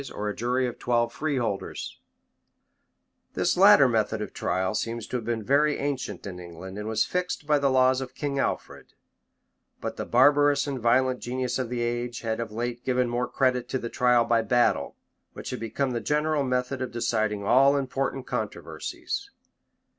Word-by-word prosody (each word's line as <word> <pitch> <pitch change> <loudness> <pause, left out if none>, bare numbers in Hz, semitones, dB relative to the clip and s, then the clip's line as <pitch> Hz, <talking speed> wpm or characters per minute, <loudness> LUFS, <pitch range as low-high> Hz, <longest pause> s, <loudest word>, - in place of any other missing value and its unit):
ii. 140 - -9
cap. 120 +4 -2 0.3
7.] 125 -9 -2 1.6
This - - +1
latter 190 -7 +7
method 110 -2 0
of 105 -2 -5
trial 95 +2 -1
seems 115 +1 -3
to 125 - -3
have 115 - -7
been 115 -1 -2
very 145 +5 +3
ancient 130 -9 -3
in 90 -2 -6
England, 90 +3 -9
and 105 - -5
was 110 0 +1
fixed 180 -4 -3
by 150 -1 +3
the 140 -1 +2
laws 130 0 +3
of 130 - -7
King 140 -2 -2
Alfred: - - -3 0.9
but - - -5
the - - -3
barbarous 145 +3 +4
and 140 -3 -3
violent 125 +2 +2
genius 125 +1 -2
of 125 -3 -2
the 120 -1 -2
age 120 -1 -2
had 110 -1 -2
of 115 -2 -4
late 120 +2 -4
given 125 -1 +1
more 120 +1 -1
credit 125 -2 0
to - - 0
the 120 -2 -5
trial 125 -1 +3
by 115 0 +3
battle, 120 +1 +1 0.4
which - - -7
had - - -4
become 120 +4 -2
the 120 -1 -2
general 150 +2 +1
method 125 0 -1
of 130 - -2
deciding 110 -3 -1
all 135 +6 +5
important 135 -1 -2
controversies. - - -4
125 Hz, 170 wpm, -26 LUFS, 115-135 Hz, 1.6 s, latter